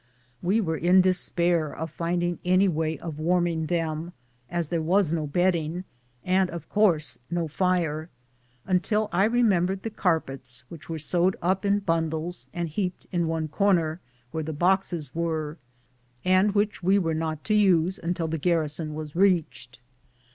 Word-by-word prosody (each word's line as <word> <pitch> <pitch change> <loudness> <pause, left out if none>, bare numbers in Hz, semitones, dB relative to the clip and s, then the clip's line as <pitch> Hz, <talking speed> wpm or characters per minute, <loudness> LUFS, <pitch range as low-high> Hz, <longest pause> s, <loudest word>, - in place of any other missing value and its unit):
We 195 +6 +2
were 160 -5 -1
in 180 +3 +5
despair 175 -3 +1
of 160 0 -6
finding 175 +1 -1
any 185 +2 +4
way 160 -2 -1
of 155 0 -7
warming 170 -1 +1
them, 165 0 -2 0.4
as 170 -3 -2
there 170 -2 0
was 175 +1 +2
no 155 -3 -1
bedding, 175 +1 0 0.4
and, 185 0 +2
of 170 -3 -7
course, 180 -8 +2
no 170 -1 -1
fire, 165 -2 0 0.6
until 210 +3 +1
I 190 +3 +3
remembered 195 -5 +2
the 225 - -4
carpets 135 -10 -2
which 165 -1 -11
were 165 - -3
sewed 175 +4 +1
up 190 +3 0
in 200 0 +2
bun 165 -3 0
dles 160 +3 -5
and 175 -1 -3
heaped* 180 +3 -3
in 170 -3 0
one 160 -1 -1
corner, 170 -2 +1 0.3
where 160 - -2
the 160 +1 -4
boxes 175 -3 0
were, 160 -2 -2 0.7
and 185 +2 +4
which 205 +1 0
we 190 +3 +3
were 165 -4 0
not 155 -1 -3
to 215 - 0
use 190 -3 +3
until 170 -1 -2
the 160 0 -3
garrison 155 -1 0
was 155 -1 -7
reached. 165 -9 +1
170 Hz, 160 wpm, -26 LUFS, 160-185 Hz, 0.7 s, in